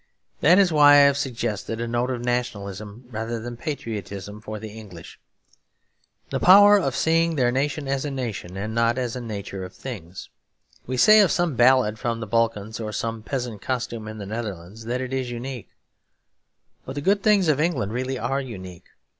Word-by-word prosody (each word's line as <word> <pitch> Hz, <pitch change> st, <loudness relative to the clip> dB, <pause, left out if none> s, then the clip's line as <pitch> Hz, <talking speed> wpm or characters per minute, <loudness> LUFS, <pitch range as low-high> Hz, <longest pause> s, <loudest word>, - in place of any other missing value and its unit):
That 180 Hz, -, +5 dB
is 195 Hz, -3 st, +4 dB
why 145 Hz, -1 st, +7 dB
I 145 Hz, -, +8 dB
have 140 Hz, 0 st, +5 dB
suggested 115 Hz, -5 st, -3 dB
a 120 Hz, -, -2 dB
note 120 Hz, +2 st, -1 dB
of 120 Hz, -2 st, -3 dB
nationalism 105 Hz, -3 st, -3 dB
rather 115 Hz, +1 st, -3 dB
than 120 Hz, +2 st, -6 dB
patriotism 105 Hz, -, -6 dB
for 110 Hz, 0 st, -6 dB
the 110 Hz, +1 st, -8 dB
English; 100 Hz, -6 st, -12 dB, 1.1 s
the -, -, -1 dB
power 205 Hz, +2 st, +8 dB
of 185 Hz, -, -1 dB
seeing 165 Hz, 0 st, +2 dB
their 125 Hz, -4 st, +2 dB
nation 140 Hz, +2 st, -1 dB
as 135 Hz, 0 st, -1 dB
a 145 Hz, -, -3 dB
nation 115 Hz, -9 st, -5 dB
and 105 Hz, +3 st, -4 dB
not 115 Hz, +1 st, +2 dB
as 125 Hz, -3 st, -2 dB
the 125 Hz, -, -5 dB
nature 100 Hz, -4 st, -6 dB
of 90 Hz, -, -9 dB
things. 95 Hz, -9 st, -8 dB, 0.6 s
We 130 Hz, +1 st, -2 dB
say 215 Hz, -, +7 dB
of 200 Hz, -4 st, +5 dB
some 175 Hz, -5 st, 0 dB
ballad 120 Hz, -3 st, +4 dB
from 120 Hz, -3 st, -2 dB
the 110 Hz, -, -4 dB
Balkans 110 Hz, -1 st, -1 dB
or 110 Hz, -1 st, -4 dB
some 115 Hz, +1 st, -3 dB
peasant 120 Hz, -3 st, -4 dB
costume 115 Hz, -3 st, -3 dB
in 110 Hz, 0 st, -7 dB
the 100 Hz, -, -6 dB
Netherlands 105 Hz, -1 st, -6 dB
that 125 Hz, +2 st, -2 dB
it 130 Hz, 0 st, -5 dB
is 130 Hz, -2 st, -2 dB
unique; 120 Hz, -1 st, -6 dB, 1.1 s
but 130 Hz, -, -8 dB
the 145 Hz, -, -3 dB
good 200 Hz, +6 st, +2 dB
things 200 Hz, -3 st, +3 dB
of 150 Hz, -2 st, +2 dB
England 140 Hz, -, 0 dB
really 130 Hz, +2 st, -2 dB
are 135 Hz, +2 st, -1 dB
unique. 95 Hz, -9 st, -9 dB
120 Hz, 190 wpm, -24 LUFS, 110-135 Hz, 1.1 s, I